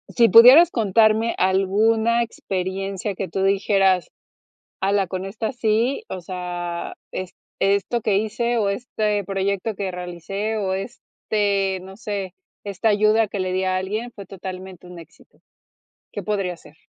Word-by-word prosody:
Si 235 -1 +6
pudieras 260 +11 +9
contarme 220 +1 +2
alguna 220 +5 +2
experiencia 195 -1 -4
que 190 - -4
tú 190 - -2
dijeras: 195 -2 +2 0.7
"Ala, 195 0 +1
con 185 +1 -5
esta 220 +4 -4
sí, 240 - 0
o 185 - -5
sea, 175 -1 -5 0.2
es 185 -1 -5 0.3
esto 200 +4 +1
que 210 -3 +1
hice 235 +3 -1
o 200 -2 +1
este 210 -1 -1
proyecto 200 +2 -2
que 195 -2 -3
realicé 180 +5 -4
o 195 -3 -1
este, 200 -2 -2
no 190 +1 -11
sé, 200 -4 -4 0.3
esta 200 +2 -1
ayuda 215 +1 +3
que 200 - -5
le 185 -1 -2
di 190 0 0
a 185 0 0
alguien 215 +6 -3
fue 200 - -10
totalmente 185 -1 -9
un 180 -1 -11
éxito". 165 -1 -17 0.7
¿Qué - - -5
podría 195 -4 -2
ser? 150 - -18
200 Hz, 145 wpm, -22 LUFS, 185-220 Hz, 0.7 s, pudieras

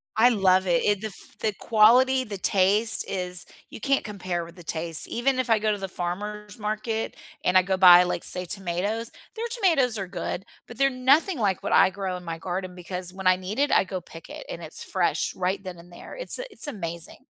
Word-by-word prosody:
I 225 +3 +5
love 190 -4 +2
it, 170 -1 +2
it 205 -1 +1
the 220 - -3
f 195 - -12
the 215 - -1
quality, 250 +6 +4
the 205 -4 -7
taste 200 +4 +3
is 180 -1 +1 0.3
you - - -9
can't 275 +4 0
compare 185 -5 -4
with 170 +1 -14
the 175 - -13
taste. 165 0 +2
Even 255 +2 -1
if 255 - -2
I 225 - +4
go 215 0 0
to 205 - -2
the 195 - -4
farmer's 205 +5 -6
market 215 +1 -3 0.3
and 180 +1 +3
I 185 - +5
go 190 +1 -1
buy, 180 -1 +8
like, 180 -1 -3
say, 180 0 +5
tomatoes, 195 +5 -3 0.3
their 455 - -4
tomatoes 325 - +1
are 195 -2 -4
good, 180 0 -5 0.2
but 240 - -12
they're 275 +1 +3
nothing 275 +6 +2
like 195 -5 -1
what - - -2
I - - +6
grow 190 -1 -4
in 180 - -12
my 165 -1 -5
garden 180 +2 -5
because 180 0 -5
when 190 0 -9
I 185 - +6
need 185 +4 -6
it, 290 +1 +1
I - - +4
go 185 -1 -5
pick 165 -1 -13
it - - -9
and - - -7
it's - - -3
fresh - - -1
right 185 +1 -2
then 185 -2 -8
and 175 +1 -16
there, 175 - -11
it's - - +4
a - - -5
it's - - +3
amazing. 170 - -6
195 Hz, 230 wpm, -25 LUFS, 180-230 Hz, 0.3 s, buy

